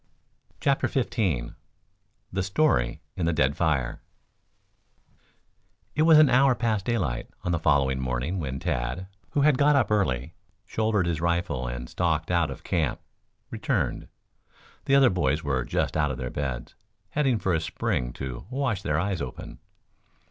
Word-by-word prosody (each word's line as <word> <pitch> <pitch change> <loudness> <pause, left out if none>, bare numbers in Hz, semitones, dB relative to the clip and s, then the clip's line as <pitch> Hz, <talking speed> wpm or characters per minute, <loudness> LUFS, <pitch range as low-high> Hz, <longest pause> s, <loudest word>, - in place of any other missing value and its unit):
CHAPTER 140 -1 +2
XV 95 - -1 0.8
THE 95 - 0
STORY 95 - +1
IN 85 - -1
THE 85 - +2
DEAD 70 -1 +2
FIRE 70 -7 0 1.9
It 155 - 0
was 160 0 +7
an 155 -1 +8
hour 130 0 +4
past 110 -5 0
daylight 80 - -1
on 90 - -1
the 85 - +1
following 65 -3 +2
morning 65 +8 -2
when 65 -4 -3
Tad, 65 +11 -2 0.3
who 145 - +2
had 145 -2 +4
got 145 0 +5
up 125 -6 +2
early, 80 - 0 0.3
shouldered 110 -4 0
his 85 -2 -1
rifle 85 -7 0
and - - -5
stalked 80 -1 -1
out 85 -2 +2
of - - -8
camp, 80 -7 0 0.5
returned. - - -1 0.8
The 135 - +4
other 135 -4 +6
boys 75 -4 0
were 70 -4 0
just - - -1
out 75 -1 +2
of 65 - -3
their 65 -1 -4
beds, 65 -4 -4 0.4
heading 135 -5 +2
for 95 -3 0
a 80 - +1
spring - - -2
to 65 +3 -6
"wash 130 -7 -1
their 75 -4 0
eyes 95 -1 -1
open." 65 -2 -7
85 Hz, 155 wpm, -26 LUFS, -, 1.9 s, an